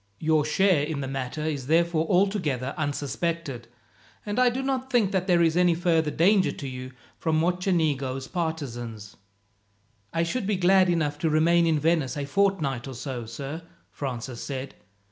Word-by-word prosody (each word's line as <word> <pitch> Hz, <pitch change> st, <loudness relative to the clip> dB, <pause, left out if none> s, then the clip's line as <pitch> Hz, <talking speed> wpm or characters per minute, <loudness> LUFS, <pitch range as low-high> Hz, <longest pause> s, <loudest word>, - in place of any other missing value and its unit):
Your 155 Hz, -1 st, +2 dB
share 180 Hz, +1 st, +3 dB
in 150 Hz, -1 st, -3 dB
the 135 Hz, -, -3 dB
matter 135 Hz, +2 st, -4 dB
is 145 Hz, -5 st, -3 dB
therefore 165 Hz, 0 st, +2 dB
altogether 175 Hz, -, +1 dB
unsuspected, 145 Hz, -2 st, -3 dB, 0.6 s
and 205 Hz, +3 st, -2 dB
I 250 Hz, -1 st, +5 dB
do 255 Hz, +2 st, -3 dB
not 265 Hz, -1 st, -2 dB
think 225 Hz, -6 st, +3 dB
that 190 Hz, -2 st, 0 dB
there 175 Hz, -2 st, +4 dB
is 165 Hz, -1 st, +2 dB
any 175 Hz, -1 st, +4 dB
further 165 Hz, -2 st, +2 dB
danger 190 Hz, +5 st, +3 dB
to 140 Hz, -, -7 dB
you 130 Hz, 0 st, -7 dB, 0.3 s
from 160 Hz, -2 st, +1 dB
Mocenigo's 160 Hz, -7 st, 0 dB
partisans." 120 Hz, -, -4 dB, 1.0 s
"I 165 Hz, 0 st, +1 dB
should 195 Hz, +5 st, -2 dB
be 210 Hz, -, +1 dB
glad 185 Hz, 0 st, +4 dB
enough 150 Hz, -4 st, 0 dB
to 160 Hz, -, +1 dB
remain 165 Hz, +2 st, +3 dB
in 160 Hz, -2 st, +3 dB
Venice 150 Hz, -3 st, +1 dB
a 140 Hz, -, -2 dB
fortnight 145 Hz, -6 st, 0 dB
or 135 Hz, -, -7 dB
so, 125 Hz, -2 st, -5 dB
sir," 140 Hz, +7 st, -6 dB, 0.3 s
Francis 125 Hz, -3 st, -5 dB
said. 135 Hz, -1 st, -5 dB
160 Hz, 165 wpm, -26 LUFS, 135-180 Hz, 1.0 s, I